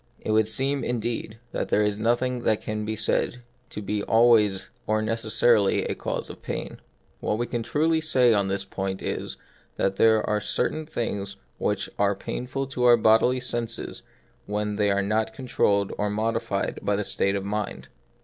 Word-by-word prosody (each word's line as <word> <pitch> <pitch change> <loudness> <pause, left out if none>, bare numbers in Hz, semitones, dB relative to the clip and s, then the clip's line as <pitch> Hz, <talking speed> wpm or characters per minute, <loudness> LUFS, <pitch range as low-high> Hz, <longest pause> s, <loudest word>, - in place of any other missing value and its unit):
It - - -3
would 110 0 +3
seem, 135 +5 0
indeed, 115 -2 -3
that - - -3
there 105 - +3
is 105 0 0
nothing 120 +2 +1
that 110 -2 +2
can 105 0 -4
be 110 +1 -2
said 115 +3 0 0.3
to 105 - -6
be 105 +1 -1
always 110 -3 +3 0.2
or 110 0 +2
necessarily 110 -1 +2
a - - -1
cause - - -4
of - - -13
pain. - - -5 0.4
What 105 - -1
we 120 - -1
can 120 -1 -3
truly 160 +6 +1
say 130 -6 +4
on 100 -2 +2
this 95 0 -2
point 95 0 -4
is, - - -3 0.4
that 95 0 0
there 110 -1 +4
are 105 0 +1
certain 155 +8 -1
things 100 -8 -3 0.2
which - - 0
are - - +3
painful 130 +2 -4
to 130 -2 -2
our 120 -1 +7
bodily 115 +3 +4
senses 120 -2 -4 0.5
when 105 0 -2
these 105 -1 +2
are 100 0 +1
not 110 +2 0
controlled 100 -6 +1
or 105 0 +1
modified 110 -1 -1
by 105 - +1
the 105 - -1
state 100 0 0
of 100 - -2
the 100 - -5
mind. 105 0 -4
110 Hz, 180 wpm, -25 LUFS, 105-120 Hz, 0.5 s, our